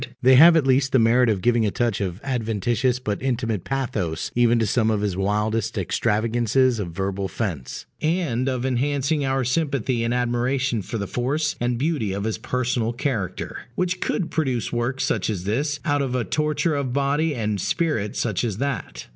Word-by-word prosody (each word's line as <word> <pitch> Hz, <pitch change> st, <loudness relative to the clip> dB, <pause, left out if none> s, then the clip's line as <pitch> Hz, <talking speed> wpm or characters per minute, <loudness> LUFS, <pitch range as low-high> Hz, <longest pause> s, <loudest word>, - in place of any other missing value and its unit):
They 130 Hz, +1 st, +7 dB
have 165 Hz, +6 st, +8 dB
at 155 Hz, -, +2 dB
least 135 Hz, 0 st, +2 dB
the -, -, +6 dB
merit 120 Hz, +1 st, +4 dB
of 100 Hz, -4 st, 0 dB
giving 120 Hz, -1 st, +3 dB
a 105 Hz, -, +2 dB
touch 115 Hz, 0 st, -1 dB
of 95 Hz, -1 st, -3 dB
adventitious 120 Hz, -1 st, 0 dB
but 105 Hz, -5 st, -3 dB
intimate 115 Hz, -7 st, -1 dB
pathos 115 Hz, -12 st, -2 dB
even 120 Hz, 0 st, +3 dB
to 115 Hz, -, +2 dB
some 110 Hz, +1 st, +1 dB
of 105 Hz, -2 st, +1 dB
his 100 Hz, -3 st, -1 dB
wildest 105 Hz, +3 st, -1 dB
extravagances 115 Hz, +3 st, +1 dB
of 95 Hz, -4 st, -3 dB
verbal 95 Hz, +2 st, -3 dB
fence, 90 Hz, -, -4 dB, 0.2 s
and 155 Hz, -7 st, 0 dB
of 130 Hz, -1 st, -2 dB
enhancing 140 Hz, +3 st, 0 dB
our 135 Hz, -1 st, 0 dB
sympathy 130 Hz, -3 st, 0 dB
and 115 Hz, -, 0 dB
admiration 125 Hz, 0 st, 0 dB
for 115 Hz, -, -5 dB
the 100 Hz, -, -3 dB
force 140 Hz, -, -1 dB
and 120 Hz, 0 st, 0 dB
beauty 135 Hz, -, -1 dB
of 100 Hz, +1 st, -3 dB
his 110 Hz, 0 st, -2 dB
personal 125 Hz, -1 st, -1 dB
character, 120 Hz, -, -3 dB
which 180 Hz, 0 st, -1 dB
could 175 Hz, -, -2 dB
produce 130 Hz, -8 st, -1 dB
work 120 Hz, +3 st, -1 dB
such 110 Hz, -6 st, 0 dB
as 95 Hz, -5 st, -3 dB
this 145 Hz, +9 st, -1 dB
out 145 Hz, -2 st, +1 dB
of 130 Hz, -2 st, -1 dB
a 125 Hz, -, +1 dB
torture 150 Hz, +4 st, 0 dB
of 140 Hz, -4 st, -2 dB
body 145 Hz, +3 st, +1 dB
and 105 Hz, -4 st, -1 dB
spirit 110 Hz, -, -1 dB
such 110 Hz, -4 st, -1 dB
as 110 Hz, -5 st, -2 dB
that. 140 Hz, +3 st, -3 dB
120 Hz, 185 wpm, -23 LUFS, 110-135 Hz, 0.2 s, have